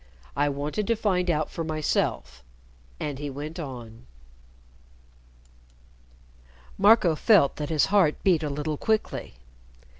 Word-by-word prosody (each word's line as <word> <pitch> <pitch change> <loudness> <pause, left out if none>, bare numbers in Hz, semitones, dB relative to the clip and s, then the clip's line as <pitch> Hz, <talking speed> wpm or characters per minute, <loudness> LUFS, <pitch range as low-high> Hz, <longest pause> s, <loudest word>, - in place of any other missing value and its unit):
I 145 +1 +1
wanted 145 +9 -3
to 230 - +2
find 185 -5 0
out 155 -2 0
for 165 - -4
myself." 155 - -2 0.6
And 145 -2 -4
he 145 0 -4
went 150 +5 -7
on. 120 - -9 2.7
Marco 175 - +5
felt 170 -4 +4
that 150 -1 -4
his 155 -3 +2
heart 180 -7 +4
beat 175 -5 +3
a 150 - -2
little 150 +1 -3
quickly. 220 - -2
155 Hz, 120 wpm, -26 LUFS, 145-180 Hz, 2.7 s, Marco